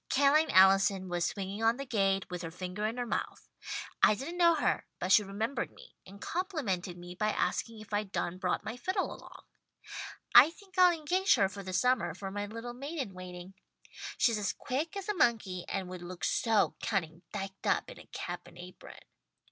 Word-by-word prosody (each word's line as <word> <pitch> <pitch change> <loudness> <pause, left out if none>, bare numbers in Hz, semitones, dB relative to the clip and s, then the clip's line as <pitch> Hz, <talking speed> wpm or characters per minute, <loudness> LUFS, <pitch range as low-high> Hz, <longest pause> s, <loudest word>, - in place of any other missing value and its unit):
Ca'line 285 +3 +4
Allison 190 0 +5
was 175 -1 0
swinging 195 +3 -4
on 225 +1 +3
the 275 - -5
gate, 195 -5 +1
with 180 -1 -4
her 165 - -5
finger 180 +4 -4
in 230 +3 -4
her 245 - -1
mouth. - - -4 0.5
I 215 - +6
didn't 330 - -6
know 340 -1 +6
her, - - 0
but 185 - -2
she 210 - +8
remembered 220 +6 -3
me, - - -16
and 200 +2 -12
complimented 230 - -2
me 175 0 -9
by 215 +4 0
asking 225 +1 -1
if 215 - -12
I'd 205 -1 -1
done 180 -1 -2
brought 180 -1 -1
my 225 +3 -5
fiddle 375 +8 -1
along. - - -13 0.9
I 255 +5 +10
think 380 +3 -17
I'll 365 -1 +7
engage 350 +4 +2
her 195 - +3
for 200 +1 -8
the 190 -1 -6
summer 250 +7 +1
for 195 -1 -6
my 205 +1 -3
little 230 +3 -6
maid 280 +7 -6
in 255 -10 -3
waiting. 180 0 -9 0.6
She's 230 -3 +3
as 205 - -1
quick 310 +9 -3
as 390 - -5
a 420 - +1
monkey 220 - +1
and 195 -2 -2
would 180 -1 -7
look 175 0 -8
so 225 -3 +2
cunning 170 -6 -2
diked 195 -1 -5
up - - +2
in - - -10
a - - -14
cap - - -6
and - - -15
apron. 180 +1 -11
205 Hz, 200 wpm, -31 LUFS, 185-265 Hz, 0.9 s, I